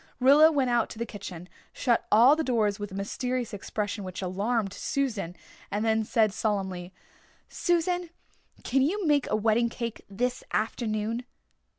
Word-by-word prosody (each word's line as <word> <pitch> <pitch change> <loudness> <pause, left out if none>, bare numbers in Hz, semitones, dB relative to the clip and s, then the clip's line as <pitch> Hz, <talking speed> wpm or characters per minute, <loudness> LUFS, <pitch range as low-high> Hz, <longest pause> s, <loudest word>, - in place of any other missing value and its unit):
Rilla 290 +5 +7
went 270 -5 +1
out 235 -2 +2
to - - -9
the 235 - -2
kitchen, 180 -5 -8 0.3
shut 240 -3 +1
all 240 +7 +7
the 320 - -1
doors 215 -7 +1
with 205 -1 -5
a - - -7
mysterious 245 +4 -3
expression 205 +1 -3
which 185 0 -6
alarmed 200 +3 -1
Susan, 220 -12 -2 0.3
and 210 +2 -1
then 220 0 +2
said 215 -2 +2
solemnly, 190 -5 -2 0.6
"Susan 350 0 0 0.5
can 270 +2 +2
you 370 +8 +1
make 295 -3 +2
a - - +2
wedding 225 +2 +2
cake 235 -1 -5
this 245 +5 -2
afternoon?" 220 +1 -1
225 Hz, 155 wpm, -27 LUFS, 205-255 Hz, 0.6 s, Rilla